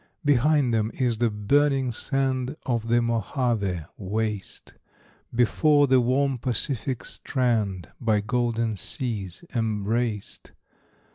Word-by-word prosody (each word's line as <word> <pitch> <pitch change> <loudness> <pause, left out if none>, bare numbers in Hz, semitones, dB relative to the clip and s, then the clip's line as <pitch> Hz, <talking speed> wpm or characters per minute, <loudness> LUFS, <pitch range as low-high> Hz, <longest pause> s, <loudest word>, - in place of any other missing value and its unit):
Behind 145 -1 +3
them 110 -1 +1
is 120 -4 0
the 120 -1 +3
burning 135 +5 +2
sand 130 +2 -1
Of 115 -3 -1
the 120 +1 +3
Mojave[A] 115 - -1
waste; 105 0 -3 0.6
Before, 145 +5 +4
the 130 -2 +4
warm 130 +1 +1
Pacific 125 +1 -1
strand, 110 - -1
By 110 -3 +2
golden 115 0 0
seas 100 - -4
embraced. 110 -1 -2
120 Hz, 100 wpm, -25 LUFS, 110-130 Hz, 0.6 s, Before